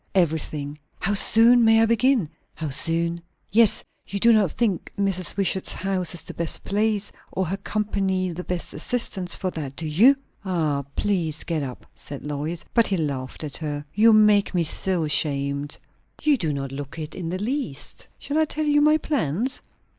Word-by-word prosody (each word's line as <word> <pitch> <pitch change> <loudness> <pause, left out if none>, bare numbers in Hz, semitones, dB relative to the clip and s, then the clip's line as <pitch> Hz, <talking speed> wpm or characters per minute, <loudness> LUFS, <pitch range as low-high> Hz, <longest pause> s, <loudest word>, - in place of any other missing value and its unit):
"Everything." 150 -4 -1 0.2
"How 195 - 0
soon 230 +4 +6
may 225 0 +6
I 225 - +5
begin?" 235 - +2 0.3
"How 155 -2 -4
soon?" 170 +3 +2 0.3
"Yes. 225 0 +4 0.2
You 200 - -3
do 235 +3 +5
not 205 -7 +3
think 210 -8 -1
Mrs. 190 -3 0
Wishart's 190 -1 0
house 185 -3 -2
is 170 - -4
the - - -8
best 170 -1 -4
place, 210 0 0 0.2
or 190 - -1
her 190 +4 -2
company 195 -3 -1
the 175 +2 -6
best 180 -1 -4
assistance 195 -7 -1
for 185 - -3
that, 140 -5 -6
do 165 - -4
you?" 205 - +5 0.3
"Ah, 160 -7 -1
please 170 -7 0
get 165 -3 -2
up!" 130 -3 -7
said 145 -1 -8
Lois. 150 +3 -4
But 230 -2 +4
he 195 - 0
laughed 140 -4 -3
at 150 - -3
her. 145 -2 -4
"You 225 +2 +5
make 210 -3 +4
me 175 - +3
so 175 +2 0
ashamed!" 140 -1 -1 0.5
"You 300 -1 +4
do 165 - -1
not 135 -2 -4
look 140 +3 -7
it 155 -1 -6
in 170 -3 -5
the 180 - -2
least. 210 - -4
Shall 295 +2 -2
I 315 - +4
tell 310 0 -3
you 295 0 +3
my 305 +1 +5
plans?" 255 - -1
185 Hz, 180 wpm, -24 LUFS, 155-215 Hz, 0.5 s, soon